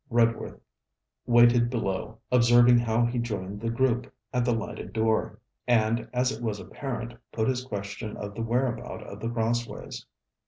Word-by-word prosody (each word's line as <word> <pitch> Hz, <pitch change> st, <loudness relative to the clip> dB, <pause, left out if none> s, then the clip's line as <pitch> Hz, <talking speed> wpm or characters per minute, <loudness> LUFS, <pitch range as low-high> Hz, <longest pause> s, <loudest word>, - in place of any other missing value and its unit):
Redworth 115 Hz, -1 st, +1 dB, 0.7 s
waited 120 Hz, 0 st, +6 dB
below, 110 Hz, -2 st, -2 dB
observing 120 Hz, 0 st, +6 dB
how 120 Hz, 0 st, +2 dB
he 120 Hz, +1 st, -1 dB
joined 105 Hz, -3 st, -4 dB
the 115 Hz, -, -1 dB
group 125 Hz, +1 st, 0 dB, 0.2 s
at 125 Hz, -1 st, +2 dB
the 120 Hz, -, +1 dB
lighted 115 Hz, -2 st, -4 dB
door, 110 Hz, 0 st, +1 dB, 0.3 s
and, 115 Hz, -1 st, +2 dB
as 125 Hz, +1 st, +1 dB
it 115 Hz, -, -6 dB
was 110 Hz, -3 st, -2 dB
apparent, 120 Hz, -2 st, -5 dB, 0.2 s
put 110 Hz, -1 st, 0 dB
his 130 Hz, -1 st, 0 dB
question 105 Hz, -2 st, -5 dB
of 100 Hz, 0 st, -6 dB
the 115 Hz, -, -5 dB
whereabout 120 Hz, +2 st, -1 dB
of -, -, -9 dB
The 115 Hz, -, -3 dB
Crossways. 120 Hz, 0 st, -3 dB
120 Hz, 155 wpm, -27 LUFS, 110-120 Hz, 0.7 s, waited